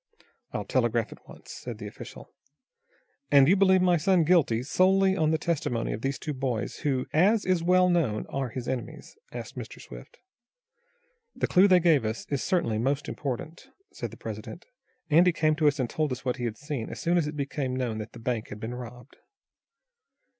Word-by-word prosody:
"I'll - - -4
telegraph - - 0
at - - -15
once," - - -12
said - - -7
the - - -8
official. - - -10 1.0
"And 140 -1 +6
you 185 - +5
believe 190 -1 +4
my 180 -1 +4
son 180 +1 +3
guilty, 150 -9 +3
solely 190 +6 +3
on 155 -4 +2
the 160 - +2
testimony 150 -8 -1
of 110 - -5
these 135 +1 -1
two 150 - -4
boys, 130 -5 -3
who, 135 -4 -1
as 200 +7 +3
is 185 -2 +2
well 180 +2 +4
known, 155 -12 +1
are 135 -2 -2
his 120 +1 -6
enemies?" 130 -2 -5 0.2
asked - - -7
Mr. - - -8
Swift. - - -12 1.2
"The - - 0
clue 190 +2 +5
they 185 -2 +6
gave 165 -7 +3
us 110 +1 -3
is 140 - 0
certainly 115 -13 0
most 135 +4 -1
important," 150 - -5 0.3
said - - -5
the - - -13
president. - - -8 0.5
"Andy 175 +4 +6
came 155 -1 +1
to 155 -1 +3
us 145 0 +2
and 130 -3 0
told 145 0 -2
what 125 0 -2
he 120 - -3
had 115 -2 -3
seen, 145 -6 -5
as - - -7
soon 170 +1 +1
as 170 -4 +2
it 150 0 -6
became 140 -2 -2
known 120 -4 -2
that 110 +1 -7
the 120 - -10
bank 115 -1 -2
had 105 - -8
been 110 +3 -5
robbed." 125 +1 -10
145 Hz, 195 wpm, -27 LUFS, 125-175 Hz, 1.2 s, And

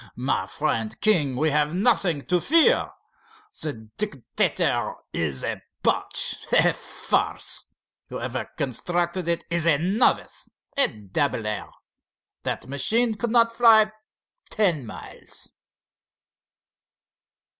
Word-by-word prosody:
My 125 -6 -1
friend 115 0 -2
King, 155 -12 +2
we 155 +4 +1
have 150 +2 +1
nothing 190 - +2
to 180 -1 +1
fear. 335 - +4 0.7
The 115 -8 -3
Dictator 180 - 0 0.2
is 70 -5 -2
a - - -3 0.2
botch, - - +1
a - - +5
farce. - - -2 0.4
Whoever - - -4
constructed 175 +7 -2
it 170 -1 0
is 170 -1 0
a 155 -4 +5
novice, 190 - 0 0.3
a 280 - +6
dabbler! 105 0 -3 0.7
That - - -3
machine 220 - +2
could 220 +3 -3
not 230 0 +4
fly 225 -2 +5 0.6
ten 170 - +1
miles!" - - -12
165 Hz, 100 wpm, -24 LUFS, 130-215 Hz, 0.7 s, a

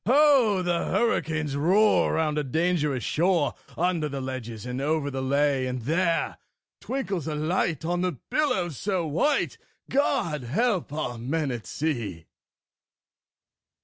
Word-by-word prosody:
Ho! 255 -8 +5
the 175 -1 0
hurricanes 160 -10 0
roar 190 +9 +3
round 155 -2 +1
a - - -1
dangerous 150 -3 0
shore, 170 - +2 0.2
Under 170 -3 +1
the 140 -1 -4
ledges 125 -4 -5
and 125 +1 -3
over 150 0 0
the 135 0 -3
lea; 140 0 +1
And 125 -2 -4
there 165 +5 0 0.4
twinkles 195 - -3
a 155 - -2
light 160 0 0
on 175 +1 0
the 180 0 0
billows 185 - -1
so 190 -4 -1
white 175 - 0 0.3
God 235 - +1
help 185 - 0
our 145 -6 -3
men 140 +4 -1
at 120 -3 -6
sea! 115 - -3
160 Hz, 135 wpm, -26 LUFS, 135-185 Hz, 0.4 s, Ho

